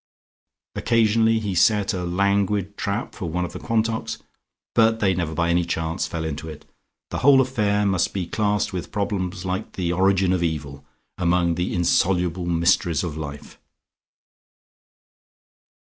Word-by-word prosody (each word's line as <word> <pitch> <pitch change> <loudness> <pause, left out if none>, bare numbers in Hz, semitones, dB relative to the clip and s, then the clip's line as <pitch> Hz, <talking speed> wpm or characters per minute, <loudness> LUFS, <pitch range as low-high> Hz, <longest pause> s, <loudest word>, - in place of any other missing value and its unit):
Occasionally 115 -1 +2
he 105 -3 -3
set 105 +3 +3
a 90 -1 -3
languid 100 +2 0
trap 100 0 -3
for 85 - -5
one 90 +2 -1
of 85 - -8
the 90 - -6
Quantocks, 115 0 -1 0.6
but 115 0 +3
they 95 -3 +2
never 85 -3 -2
by 85 +1 +1
any 85 0 +2
chance 80 0 -2
fell 80 -1 -4
into 80 +1 -5
it. 75 -1 -10 0.5
The - - -2
whole 140 0 +6
affair 105 -6 +1
must 95 -3 +1
be 95 -3 -3
classed 105 +2 -1
with 90 -1 -5
problems 95 -3 -2
like 95 0 -3
the 85 -2 -1
origin 95 0 +2
of 90 - 0
evil, 70 -4 -3 0.4
among 85 0 +2
the 90 +2 -2
insoluble 90 0 +1
mysteries 85 -1 +2
of 85 -4 -4
life. 75 -2 -8
90 Hz, 150 wpm, -23 LUFS, 85-105 Hz, 0.6 s, whole